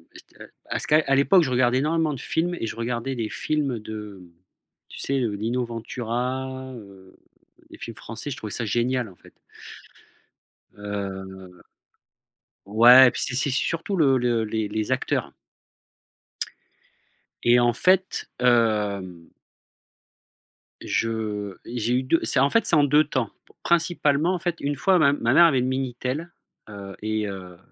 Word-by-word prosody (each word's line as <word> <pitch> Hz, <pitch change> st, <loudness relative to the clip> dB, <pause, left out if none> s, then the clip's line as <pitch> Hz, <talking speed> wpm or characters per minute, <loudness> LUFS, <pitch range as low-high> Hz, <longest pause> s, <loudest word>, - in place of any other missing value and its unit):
cette -, -, -14 dB, 0.2 s
à -, -, -1 dB
ce -, -, -3 dB
que 150 Hz, -, +4 dB
à 135 Hz, -, +4 dB
l'époque 170 Hz, +7 st, +4 dB
je 140 Hz, -, -2 dB
regardais 125 Hz, 0 st, +2 dB
énormément 155 Hz, +1 st, 0 dB
de 135 Hz, -, -7 dB
films 175 Hz, +6 st, -1 dB
et 115 Hz, -, -3 dB
je -, -, -6 dB
regardais 120 Hz, +3 st, -3 dB
des 115 Hz, -3 st, -3 dB
films 140 Hz, -4 st, -2 dB
de 105 Hz, -2 st, -8 dB, 0.7 s
tu -, -, -11 dB
sais, 140 Hz, 0 st, -1 dB
heu, 115 Hz, -3 st, -1 dB
Lino 115 Hz, +5 st, -2 dB
Ventura, 125 Hz, +3 st, -4 dB
heu, 100 Hz, -4 st, -14 dB, 0.5 s
des -, -, -13 dB
films 115 Hz, -, -8 dB
français, 115 Hz, +5 st, -7 dB
je 140 Hz, -, -5 dB
trouvais 110 Hz, -7 st, -7 dB
ça 115 Hz, -, -3 dB
génial 120 Hz, +2 st, -1 dB
en 90 Hz, -, -17 dB
fait -, -, -19 dB, 1.4 s
heu. 95 Hz, -3 st, -7 dB, 1.0 s
Ouais, 120 Hz, +5 st, +8 dB
puis -, -, -3 dB
c'est 125 Hz, -, -3 dB
c'est 140 Hz, +3 st, +2 dB
surtout 165 Hz, +8 st, -1 dB
le 140 Hz, -7 st, +3 dB
le 120 Hz, -2 st, 0 dB
les 110 Hz, 0 st, -2 dB
les 110 Hz, +3 st, -3 dB
acteurs. 130 Hz, -, -1 dB, 2.1 s
Et 120 Hz, +1 st, +5 dB
en 120 Hz, 0 st, +3 dB
fait, 185 Hz, +5 st, +2 dB
hem 105 Hz, -8 st, 0 dB, 1.5 s
je 105 Hz, -4 st, -3 dB
et 120 Hz, +1 st, -5 dB
j'ai 115 Hz, +2 st, 0 dB
eu 130 Hz, -, 0 dB
2 160 Hz, +6 st, +2 dB
c'est 140 Hz, -, +2 dB
en 135 Hz, +2 st, +4 dB
fait, 230 Hz, -, +2 dB
c'est -, -, +3 dB
en 150 Hz, -, +5 dB
2 150 Hz, +2 st, +4 dB
temps. 130 Hz, -7 st, -2 dB, 0.3 s
Principalement 170 Hz, -1 st, +1 dB
en 180 Hz, -, -2 dB
fait, 175 Hz, -1 st, -2 dB
une 145 Hz, +1 st, -1 dB
fois 185 Hz, +6 st, +3 dB
ma 145 Hz, -3 st, +5 dB
m 145 Hz, -, 0 dB
ma 120 Hz, +2 st, +2 dB
mère 170 Hz, -, +7 dB
avait 140 Hz, -6 st, +3 dB
le 125 Hz, -, 0 dB
Minitel 130 Hz, +5 st, -3 dB, 0.4 s
heu, 100 Hz, -2 st, -9 dB
et 110 Hz, 0 st, -2 dB
heu, 90 Hz, -3 st, -8 dB
125 Hz, 160 wpm, -24 LUFS, 110-140 Hz, 2.1 s, Ouais